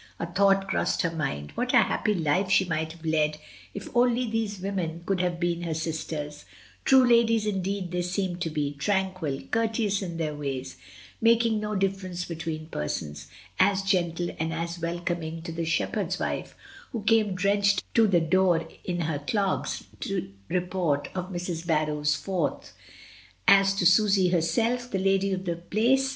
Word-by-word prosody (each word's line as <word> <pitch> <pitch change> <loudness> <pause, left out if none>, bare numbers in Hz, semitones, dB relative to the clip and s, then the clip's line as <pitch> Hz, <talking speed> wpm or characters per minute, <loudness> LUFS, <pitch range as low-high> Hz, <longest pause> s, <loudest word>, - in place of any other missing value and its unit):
A - - -1
thought 195 +2 +3
crossed 190 - 0
her 170 - 0
mind, 75 - -3
what - - -1
a - - +7
happy 210 - 0
life 175 +3 +1
she 190 0 +4
might 160 -2 -2
have 165 -1 -14
led 155 -1 +1 0.4
if 200 - -6
only 245 0 +3
these 220 -3 -2
women 180 -4 -3
could 190 -2 0
have 175 -1 -1
been 175 -1 0
her 165 -2 -2
sisters 155 -2 -4 0.2
— 95 -2 -26
true 265 -1 +6
ladies 230 -2 +4
indeed 195 -2 -2
they 180 0 0
seemed 180 0 -2
to 165 - 0
be 145 -2 -2
— - - -20
tranquil, 185 -6 -1
courteous 220 -3 +1
in 170 -3 -5
their 155 -2 -2
ways, 135 -7 -5 0.4
making 230 -1 +4
no 210 0 -3
difference 190 -2 -2
between 160 -2 -5
persons, 75 - -4 0.3
as 195 +1 +4
gentle 175 -3 0
and 160 +1 -1
as 170 +1 -3
wel 170 +1 -2
coming 165 -2 -3
to 165 - -5
the 165 0 -3
shepherd's 165 - -1
wife, - - -3 0.4
who 225 -4 -3
came 215 -3 +3
drenched 200 +2 +2
to 225 -1 +5
the 180 -4 +4
door 170 0 +2 0.2
in 175 -1 -2
her 155 -3 -1
clogs, 195 +6 -1 0.2
to 190 - -3 0.2
report 180 -5 0
of 185 0 -4
Mrs. 175 -2 -4
Barrow's 150 -2 +1
fourth, 180 -2 -3 0.7
as 195 0 +6
to 195 - 0
Susy 195 0 +5
herself, 230 +8 +1
the 195 - -1
lady 195 +1 +2
of 190 0 -2
the 170 -2 -2
Place. 240 +10 +2
180 Hz, 170 wpm, -27 LUFS, 160-200 Hz, 0.7 s, a